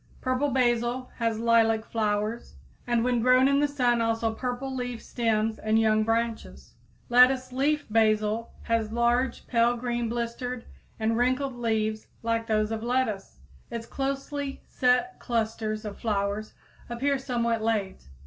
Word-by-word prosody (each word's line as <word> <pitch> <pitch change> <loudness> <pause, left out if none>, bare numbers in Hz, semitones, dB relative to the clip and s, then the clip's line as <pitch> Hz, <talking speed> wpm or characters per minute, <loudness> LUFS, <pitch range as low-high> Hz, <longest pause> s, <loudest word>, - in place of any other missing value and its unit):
Purple 255 +3 0
basil 245 0 0
has 230 -2 0
lilac 225 -1 +3
flowers, 215 - -2 0.3
and 240 -1 +2
when 245 -1 +1
grown 255 +2 +5
in 280 0 +3
the 290 - +3
sun 245 -4 +1
also 225 0 0
purple 250 +3 -4
leaf 245 -2 -4
stems 225 -2 -1
and 215 0 +1
young 215 -1 +3
branches. 225 +1 -2 0.3
Lettuce 255 +1 +5
leaved 290 +3 +1
basil 215 0 +2
has 225 -2 0
large, 240 +2 +1
pale 235 0 +2
green 240 -1 -2
blistered 235 +1 -4 0.3
and 225 +1 +1
wrinkled 255 +2 +1
leaves 220 -2 -1 0.2
like 230 0 -1
those 215 0 +1
of 220 -1 -3
lettuce. 230 - -2 0.3
Its 230 -1 -5
closely 275 +1 -4
set 250 0 +1
clusters 220 -2 -2
of 205 -1 -7
flowers 205 -1 -2 0.3
appear 270 +4 0
somewhat 235 -4 -1
late. 210 - -2
235 Hz, 140 wpm, -27 LUFS, 220-250 Hz, 0.3 s, grown